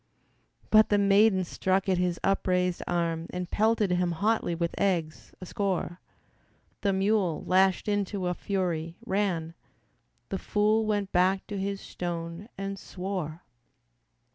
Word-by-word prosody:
But 215 Hz, 0 st, +6 dB
the 205 Hz, -, +4 dB
maiden 200 Hz, -1 st, +4 dB
struck 190 Hz, +2 st, 0 dB
at 185 Hz, -2 st, +2 dB
his 180 Hz, -1 st, 0 dB
upraised 180 Hz, -2 st, +1 dB
arm 170 Hz, -1 st, -1 dB
And 180 Hz, -1 st, -5 dB
pelted 215 Hz, -2 st, +2 dB
him 180 Hz, -1 st, +1 dB
hotly 205 Hz, -1 st, 0 dB
with 170 Hz, 0 st, -2 dB
eggs, 170 Hz, -6 st, -1 dB
a 185 Hz, -, -8 dB
score. 185 Hz, -2 st, -2 dB, 0.8 s
The 200 Hz, -, +2 dB
mule, 195 Hz, -3 st, +1 dB
lashed 190 Hz, +1 st, +3 dB
into 205 Hz, -2 st, -1 dB
a 180 Hz, -, +1 dB
fury, 175 Hz, -4 st, -2 dB
ran; 180 Hz, -5 st, -1 dB, 0.8 s
The 195 Hz, -, -2 dB
fool 215 Hz, +1 st, +1 dB
went 205 Hz, -2 st, -1 dB
back 185 Hz, +2 st, +2 dB
to 205 Hz, -, -5 dB
his 195 Hz, 0 st, -3 dB
stone 170 Hz, +3 st, -5 dB
and 195 Hz, 0 st, -4 dB
swore. 180 Hz, -4 st, -5 dB
190 Hz, 135 wpm, -28 LUFS, 175-200 Hz, 0.8 s, But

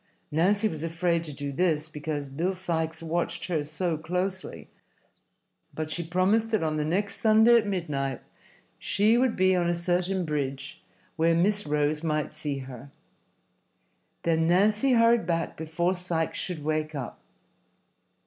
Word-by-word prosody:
Nancy 200 Hz, +8 st, +2 dB
was 160 Hz, -7 st, -5 dB
afraid 170 Hz, +1 st, 0 dB
to 150 Hz, -, -6 dB
do 140 Hz, 0 st, -5 dB
this, 155 Hz, 0 st, +1 dB
because 150 Hz, -2 st, -4 dB
Bill 165 Hz, +8 st, -1 dB
Sikes 165 Hz, -3 st, -3 dB
watched 165 Hz, +1 st, -2 dB
her 160 Hz, -4 st, 0 dB
so 160 Hz, +2 st, -2 dB
closely, 180 Hz, +3 st, -3 dB, 1.1 s
but 155 Hz, 0 st, -4 dB
she 175 Hz, -, -1 dB
promised 185 Hz, +7 st, +1 dB
that 220 Hz, -7 st, +1 dB
on 155 Hz, -1 st, -1 dB
the 150 Hz, -, 0 dB
next 200 Hz, +6 st, -1 dB
Sunday 220 Hz, +2 st, +6 dB
at 215 Hz, -2 st, +1 dB
midnight 145 Hz, -9 st, -2 dB, 0.6 s
she 210 Hz, +3 st, +2 dB
would 250 Hz, -1 st, +2 dB
be 185 Hz, 0 st, +3 dB
on 175 Hz, -1 st, +1 dB
a 175 Hz, -, +1 dB
certain 180 Hz, +1 st, 0 dB
bridge 135 Hz, -3 st, -4 dB, 0.4 s
where 165 Hz, +1 st, +3 dB
Miss 200 Hz, +3 st, +1 dB
Rose 150 Hz, +1 st, 0 dB
might 155 Hz, -2 st, -1 dB
see 150 Hz, -2 st, -3 dB
her. 130 Hz, +1 st, -10 dB, 1.3 s
Then 165 Hz, -1 st, +2 dB
Nancy 210 Hz, +9 st, +3 dB
hurried 230 Hz, -4 st, +4 dB
back 165 Hz, -1 st, -1 dB
before 165 Hz, +3 st, -1 dB
Sikes 175 Hz, -3 st, -2 dB
should 170 Hz, -5 st, -4 dB
wake 155 Hz, 0 st, -1 dB
up. 135 Hz, -4 st, -6 dB
170 Hz, 150 wpm, -27 LUFS, 155-185 Hz, 1.3 s, Sunday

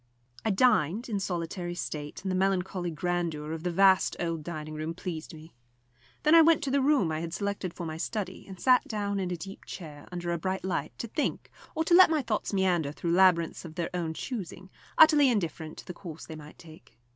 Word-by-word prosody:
I -, -, 0 dB
dined 215 Hz, -, +2 dB
in 205 Hz, -3 st, -1 dB
solitary 175 Hz, -1 st, -3 dB
state, 150 Hz, -3 st, -5 dB
and 190 Hz, -, -2 dB
the -, -, 0 dB
melancholy 185 Hz, -1 st, 0 dB
grandeur 165 Hz, -2 st, -2 dB
of 160 Hz, 0 st, -4 dB
the 180 Hz, -, -1 dB
vast 190 Hz, +2 st, +4 dB
old 165 Hz, -2 st, -2 dB
dining 155 Hz, -2 st, -6 dB
room 155 Hz, +2 st, -4 dB
pleased 170 Hz, -3 st, -6 dB
me. 160 Hz, +1 st, -13 dB, 0.7 s
Then 305 Hz, -, +4 dB
I 330 Hz, -, +9 dB
went 320 Hz, -1 st, +4 dB
to 275 Hz, -, -1 dB
the 280 Hz, 0 st, +3 dB
room 265 Hz, -, +3 dB
I 155 Hz, -, -2 dB
had 165 Hz, +1 st, -4 dB
selected 200 Hz, -3 st, -3 dB
for 170 Hz, -, -7 dB
my 160 Hz, -1 st, -5 dB
study, 190 Hz, +1 st, -4 dB
and 190 Hz, -2 st, -10 dB
sat 255 Hz, +3 st, +4 dB
down 205 Hz, -2 st, -2 dB
in 185 Hz, -2 st, -2 dB
a 180 Hz, -, -3 dB
deep 195 Hz, +4 st, -9 dB
chair, 150 Hz, -5 st, -9 dB
under 175 Hz, -1 st, -3 dB
a 170 Hz, -, -1 dB
bright 185 Hz, +2 st, -2 dB
light, 165 Hz, -5 st, -3 dB
to 235 Hz, -, -4 dB
think, 290 Hz, +7 st, -2 dB, 0.2 s
or 320 Hz, -, +1 dB
to 345 Hz, -, +1 dB
let 370 Hz, 0 st, +9 dB
my 310 Hz, -3 st, +1 dB
thoughts 225 Hz, -3 st, -2 dB
meander 180 Hz, -7 st, +1 dB
through 170 Hz, +3 st, -3 dB
labyrinths 175 Hz, -3 st, +3 dB
of 165 Hz, -2 st, -10 dB
their 170 Hz, -1 st, -3 dB
own 165 Hz, -3 st, -2 dB
choosing, 190 Hz, -, -6 dB, 0.3 s
utterly 300 Hz, -3 st, +7 dB
indifferent 165 Hz, -8 st, -2 dB
to -, -, -10 dB
the 180 Hz, -, -7 dB
course 170 Hz, -3 st, -9 dB
they 160 Hz, -, -8 dB
might 150 Hz, 0 st, -12 dB
take. 160 Hz, -6 st, -16 dB
180 Hz, 215 wpm, -29 LUFS, 165-200 Hz, 0.7 s, I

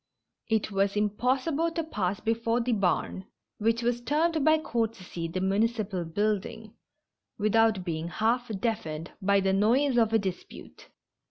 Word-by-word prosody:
It 220 Hz, -1 st, 0 dB
was 195 Hz, 0 st, +1 dB
impossible 255 Hz, +10 st, +1 dB
to 330 Hz, -, -1 dB
pass 200 Hz, -, -2 dB
before 230 Hz, +1 st, 0 dB
the 245 Hz, +1 st, -1 dB
barn, 190 Hz, -2 st, 0 dB, 0.3 s
which 230 Hz, +2 st, +1 dB
was 240 Hz, 0 st, 0 dB
termed 310 Hz, +4 st, +1 dB
by 315 Hz, +1 st, +5 dB
courtesy 225 Hz, -, -3 dB
the 180 Hz, +3 st, -3 dB
municipal 200 Hz, -1 st, 0 dB
building, 210 Hz, +4 st, -2 dB, 0.6 s
without 215 Hz, -2 st, +2 dB
being 165 Hz, -1 st, -3 dB
half 230 Hz, +7 st, 0 dB
deaf 220 Hz, -1 st, -2 dB
ened 155 Hz, +2 st, -6 dB
by 200 Hz, +1 st, +3 dB
the 190 Hz, 0 st, +1 dB
noise 240 Hz, +6 st, +3 dB
of 225 Hz, -1 st, +3 dB
a 225 Hz, -, +4 dB
dispute. 190 Hz, -4 st, -7 dB
220 Hz, 145 wpm, -28 LUFS, 195-240 Hz, 0.6 s, by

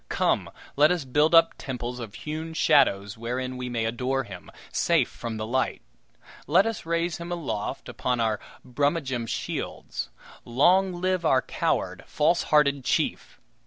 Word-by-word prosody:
Come, -, -, +1 dB, 0.3 s
let 150 Hz, +3 st, +5 dB
us 175 Hz, -6 st, -1 dB
build 150 Hz, +5 st, +3 dB
up 165 Hz, 0 st, +6 dB
temples 125 Hz, -1 st, -5 dB
of 110 Hz, -4 st, -7 dB
hewn 160 Hz, +2 st, -5 dB
shadows 110 Hz, -10 st, +3 dB
wherein 125 Hz, +2 st, -3 dB
we 125 Hz, 0 st, -4 dB
may 115 Hz, -2 st, -1 dB
adore 130 Hz, +3 st, -1 dB
him, 95 Hz, -6 st, -10 dB, 0.2 s
safe -, -, +2 dB
from 115 Hz, -2 st, -6 dB
the 110 Hz, -, -3 dB
light. 130 Hz, +4 st, -1 dB, 0.6 s
Let 180 Hz, +8 st, +5 dB
us 225 Hz, -7 st, -4 dB
raise 170 Hz, 0 st, 0 dB
him 170 Hz, +1 st, -7 dB
aloft 145 Hz, -12 st, -3 dB
upon 125 Hz, -1 st, -2 dB
our 110 Hz, -2 st, +1 dB, 0.3 s
Brummagem 130 Hz, -2 st, -1 dB
shields. -, -, -4 dB, 0.3 s
Long 180 Hz, +10 st, +3 dB
live 185 Hz, -1 st, +1 dB
our 130 Hz, -5 st, +3 dB
coward, -, -, -1 dB
falsehearted 150 Hz, -3 st, +2 dB
chief! -, -, -1 dB
135 Hz, 145 wpm, -26 LUFS, 120-165 Hz, 0.6 s, up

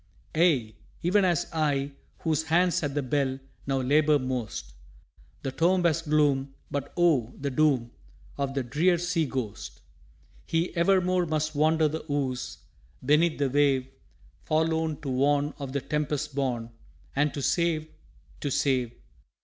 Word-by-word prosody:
Aye, 145 Hz, -10 st, +3 dB, 0.3 s
even 195 Hz, +4 st, +3 dB
as 175 Hz, -5 st, +2 dB
I, 145 Hz, -3 st, 0 dB, 0.3 s
whose 160 Hz, -1 st, 0 dB
hands 175 Hz, +2 st, +2 dB
at 145 Hz, -3 st, -3 dB
the 145 Hz, -, 0 dB
bell 135 Hz, 0 st, 0 dB, 0.3 s
Now 135 Hz, -1 st, +1 dB
labour 150 Hz, +3 st, +4 dB
most. 125 Hz, -, -4 dB, 0.7 s
The 135 Hz, -, -2 dB
tomb 175 Hz, +5 st, +2 dB
has 165 Hz, -1 st, +2 dB
gloom, 145 Hz, -3 st, +1 dB, 0.2 s
but 140 Hz, 0 st, -3 dB
Oh, 150 Hz, -10 st, +2 dB
the 140 Hz, 0 st, -2 dB
doom 130 Hz, -4 st, +2 dB, 0.4 s
Of 140 Hz, -1 st, -2 dB
the 135 Hz, -, 0 dB
drear 160 Hz, +9 st, +2 dB
sea 170 Hz, -2 st, 0 dB
ghost! 125 Hz, -6 st, -5 dB, 0.7 s
He 165 Hz, +2 st, -1 dB
evermore 180 Hz, 0 st, +2 dB
must 155 Hz, 0 st, -1 dB
wander 155 Hz, +1 st, +3 dB
the 160 Hz, +2 st, -4 dB
ooze 130 Hz, -3 st, -2 dB, 0.5 s
Beneath 155 Hz, +4 st, +3 dB
the 140 Hz, -2 st, 0 dB
wave, 135 Hz, -2 st, +2 dB, 0.5 s
Forlorn 160 Hz, 0 st, 0 dB
to 140 Hz, -, -4 dB
warn 140 Hz, +3 st, +2 dB
of 140 Hz, -2 st, -5 dB
the 140 Hz, 0 st, -2 dB
tempest 150 Hz, 0 st, -2 dB
born, 125 Hz, -4 st, -2 dB, 0.4 s
And 145 Hz, +1 st, +2 dB
to 140 Hz, -, -3 dB
save 165 Hz, -1 st, +1 dB, 0.5 s
to 145 Hz, -, -2 dB
save! 130 Hz, -3 st, +1 dB
145 Hz, 140 wpm, -27 LUFS, 135-160 Hz, 0.7 s, labour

